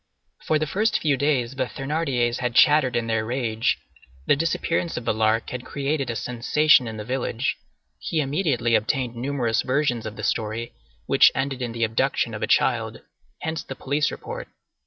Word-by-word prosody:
For 155 Hz, -, +3 dB
the 155 Hz, -, -1 dB
first 210 Hz, +9 st, +1 dB
few 150 Hz, -3 st, +2 dB
days 135 Hz, -4 st, 0 dB
the 130 Hz, -1 st, -1 dB
Thénardiers 135 Hz, -5 st, -1 dB
had 125 Hz, -1 st, -2 dB
chattered 135 Hz, 0 st, +5 dB
in 115 Hz, -, 0 dB
their 115 Hz, -1 st, 0 dB
rage. 120 Hz, 0 st, 0 dB, 0.5 s
The -, -, +4 dB
disappearance 165 Hz, +2 st, -1 dB
of 120 Hz, -, -5 dB
the -, -, +2 dB
Lark 110 Hz, +1 st, +1 dB
had 125 Hz, -1 st, -5 dB
created 140 Hz, -1 st, -2 dB
a 115 Hz, -, -2 dB
sensation 125 Hz, +4 st, +3 dB
in 110 Hz, -1 st, -6 dB
the 105 Hz, -, -6 dB
village. 125 Hz, 0 st, -1 dB, 0.4 s
He 160 Hz, -, -2 dB
immediately 135 Hz, -5 st, 0 dB
obtained 120 Hz, +2 st, +1 dB
numerous 120 Hz, -3 st, 0 dB
versions 130 Hz, -4 st, 0 dB
of 110 Hz, -, -7 dB
the -, -, -8 dB
story, 115 Hz, +1 st, -2 dB, 0.3 s
which -, -, +6 dB
ended 135 Hz, -1 st, -2 dB
in 120 Hz, -2 st, -2 dB
the 115 Hz, 0 st, -2 dB
abduction 115 Hz, 0 st, 0 dB
of -, -, -5 dB
a -, -, 0 dB
child. -, -, +1 dB, 0.4 s
Hence 160 Hz, 0 st, -2 dB
the 135 Hz, -, -8 dB
police 145 Hz, +4 st, 0 dB
report. -, -, -7 dB
130 Hz, 180 wpm, -24 LUFS, 115-145 Hz, 0.5 s, which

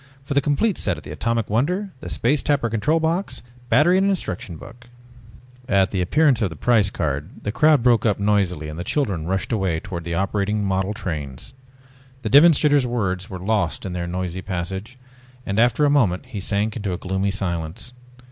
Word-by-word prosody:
"For 140 Hz, -, -4 dB
the 140 Hz, -, +3 dB
complete 155 Hz, +9 st, +1 dB
set 90 Hz, -5 st, 0 dB
of 75 Hz, -, -11 dB
the -, -, -9 dB
Atomic 115 Hz, +8 st, -1 dB
Wonder, 180 Hz, -, 0 dB
the -, -, -7 dB
Space 140 Hz, +5 st, +1 dB
Tapper 140 Hz, -6 st, 0 dB
control 150 Hz, +9 st, +1 dB
box, 165 Hz, +5 st, -1 dB, 0.3 s
battery 175 Hz, +6 st, +5 dB
and 195 Hz, +1 st, +2 dB
instruction 90 Hz, -, -3 dB
book 120 Hz, +7 st, -13 dB, 0.4 s
..." 125 Hz, +2 st, -23 dB
At 95 Hz, 0 st, +2 dB
the 95 Hz, -, 0 dB
appearance 135 Hz, -, +3 dB
of 100 Hz, -, +1 dB
the 80 Hz, -, -9 dB
price 110 Hz, +2 st, +3 dB
card 75 Hz, 0 st, -4 dB
the 105 Hz, -, -2 dB
crowd 150 Hz, +2 st, +4 dB
broke 120 Hz, -4 st, +4 dB
up 105 Hz, -3 st, +1 dB
noisily 100 Hz, -6 st, +1 dB
and 75 Hz, +2 st, -7 dB
the -, -, -3 dB
children 95 Hz, -, -1 dB
rushed 95 Hz, +5 st, -1 dB
away 95 Hz, -7 st, 0 dB
towards 90 Hz, -2 st, -6 dB
the 85 Hz, -1 st, -2 dB
operating 100 Hz, +2 st, 0 dB
model 95 Hz, +2 st, -1 dB
trains. 80 Hz, -, -5 dB, 0.7 s
The -, -, -1 dB
demonstrator's 145 Hz, -2 st, +6 dB
words 95 Hz, -6 st, -2 dB
were 95 Hz, -, -6 dB
lost 100 Hz, -1 st, -1 dB
in 95 Hz, -, -4 dB
their 85 Hz, -1 st, -3 dB
noisy 90 Hz, 0 st, -3 dB
passage, 95 Hz, +6 st, -5 dB, 0.5 s
and 100 Hz, +2 st, -1 dB
after 120 Hz, +5 st, +3 dB
a -, -, +4 dB
moment 110 Hz, -8 st, +2 dB
he 110 Hz, -6 st, -5 dB
sank 105 Hz, +2 st, -1 dB
into 100 Hz, -5 st, -3 dB
a -, -, -3 dB
gloomy 95 Hz, +2 st, -1 dB
silence. 90 Hz, +1 st, -3 dB
105 Hz, 195 wpm, -22 LUFS, 90-125 Hz, 0.7 s, demonstrator's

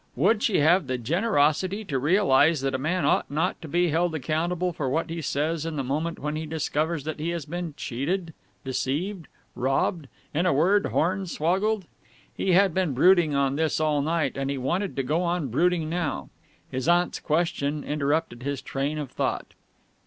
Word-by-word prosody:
Would 225 Hz, -2 st, +3 dB
she 200 Hz, -10 st, +2 dB
have 165 Hz, +1 st, +4 dB
the 130 Hz, -1 st, -1 dB
generosity 180 Hz, -, +1 dB
to 135 Hz, -7 st, -1 dB
realize 155 Hz, -2 st, +4 dB
that 135 Hz, -1 st, -1 dB
a 130 Hz, -, -1 dB
man 160 Hz, +3 st, 0 dB
ought -, -, +2 dB
not 160 Hz, +6 st, -1 dB
to 160 Hz, -, -7 dB
be 175 Hz, +3 st, +2 dB
held 165 Hz, +1 st, +1 dB
accountable 170 Hz, +5 st, -1 dB
for 140 Hz, -4 st, -2 dB
what 160 Hz, +4 st, -1 dB
he 165 Hz, 0 st, -3 dB
says 155 Hz, +2 st, -1 dB
in 165 Hz, -1 st, -4 dB
the 140 Hz, -, -1 dB
moment 155 Hz, +6 st, -2 dB
when 150 Hz, +1 st, -3 dB
he 155 Hz, 0 st, -4 dB
discovers 155 Hz, 0 st, -1 dB
that 155 Hz, +1 st, -5 dB
he 160 Hz, +3 st, -2 dB
has 170 Hz, -4 st, -3 dB
been 170 Hz, -1 st, -5 dB
cheated, 160 Hz, +7 st, -3 dB, 0.3 s
deceived, 155 Hz, +7 st, -2 dB, 0.3 s
robbed 135 Hz, +5 st, 0 dB, 0.3 s
in 170 Hz, +5 st, +1 dB
a -, -, +3 dB
word, 190 Hz, +8 st, +3 dB
hornswoggled? 185 Hz, +4 st, 0 dB, 0.5 s
He 190 Hz, -, +1 dB
had 190 Hz, -1 st, +4 dB
been 180 Hz, -7 st, 0 dB
brooding 170 Hz, 0 st, +5 dB
on 140 Hz, 0 st, +1 dB
this 160 Hz, -1 st, +1 dB
all 155 Hz, -2 st, +2 dB
night, 155 Hz, -2 st, 0 dB
and 135 Hz, 0 st, -2 dB
he 140 Hz, -, -2 dB
wanted 175 Hz, +9 st, -1 dB
to 135 Hz, -, -1 dB
go 155 Hz, +6 st, 0 dB
on 170 Hz, -5 st, -1 dB
brooding 165 Hz, +5 st, +1 dB
now. 160 Hz, -, -3 dB, 0.4 s
His 130 Hz, +2 st, -3 dB
aunt's 175 Hz, +1 st, +2 dB
question 155 Hz, -2 st, -1 dB
interrupted 145 Hz, -3 st, -1 dB
his 140 Hz, +1 st, -3 dB
train 140 Hz, +3 st, -2 dB
of 145 Hz, -4 st, -5 dB
thought. -, -, -2 dB
160 Hz, 180 wpm, -26 LUFS, 140-175 Hz, 0.5 s, brooding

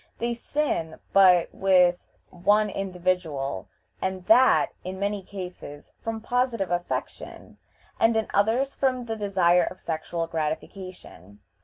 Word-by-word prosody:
They 235 Hz, +1 st, -1 dB
sin 235 Hz, -, -2 dB, 0.2 s
but 180 Hz, -3 st, +5 dB
with 180 Hz, -2 st, +4 dB, 0.3 s
one 205 Hz, +4 st, +2 dB
individual, 180 Hz, -, -2 dB, 0.3 s
and 190 Hz, -1 st, -3 dB
that, 250 Hz, +6 st, +5 dB
in 185 Hz, +1 st, -6 dB
many 200 Hz, 0 st, -1 dB
cases, 180 Hz, -6 st, -9 dB
from 225 Hz, -1 st, -4 dB
positive 235 Hz, -5 st, 0 dB
affection, 175 Hz, 0 st, -5 dB, 0.4 s
and 225 Hz, 0 st, +4 dB
in 220 Hz, -, +1 dB
others 230 Hz, +7 st, +2 dB
from 255 Hz, -2 st, 0 dB
the 225 Hz, -1 st, -3 dB
desire 185 Hz, -4 st, +3 dB
of 185 Hz, -, -12 dB
sexual 165 Hz, +1 st, -3 dB
gratification. 160 Hz, -, -6 dB
190 Hz, 120 wpm, -26 LUFS, 175-220 Hz, 0.4 s, but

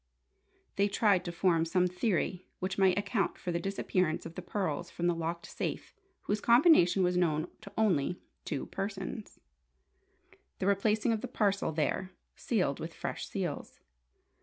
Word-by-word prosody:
They 200 Hz, +1 st, +4 dB
tried 200 Hz, -2 st, +3 dB
to 175 Hz, -, -3 dB
form 170 Hz, -1 st, +2 dB
some 180 Hz, +2 st, +2 dB
theory 180 Hz, 0 st, -1 dB
which 185 Hz, +1 st, -3 dB
might 190 Hz, -1 st, +4 dB
account 205 Hz, 0 st, 0 dB
for 180 Hz, -, -4 dB
the 170 Hz, -, 0 dB
disappearance 185 Hz, -2 st, -1 dB
of 165 Hz, -, -7 dB
the -, -, -6 dB
pearls 175 Hz, -4 st, -2 dB
from 175 Hz, -, -4 dB
the 175 Hz, -, +3 dB
locked 170 Hz, +1 st, -3 dB
safe -, -, -4 dB, 0.3 s
whose 210 Hz, +1 st, -1 dB
combination 235 Hz, -, +6 dB
was 180 Hz, 0 st, +2 dB
known 160 Hz, -2 st, +1 dB
to 200 Hz, -, -10 dB
only 180 Hz, -6 st, +2 dB, 0.2 s
two 145 Hz, -5 st, -3 dB
persons; 195 Hz, +1 st, -5 dB, 1.2 s
the 185 Hz, -, -2 dB
replacing 210 Hz, +3 st, +2 dB
of 220 Hz, -, -2 dB
the -, -, -4 dB
parcel 200 Hz, -5 st, +1 dB
there, 165 Hz, +4 st, -1 dB, 0.2 s
sealed 180 Hz, -, 0 dB
with 165 Hz, +1 st, -6 dB
fresh -, -, -4 dB
seals. -, -, -4 dB
185 Hz, 155 wpm, -31 LUFS, 170-200 Hz, 1.2 s, combination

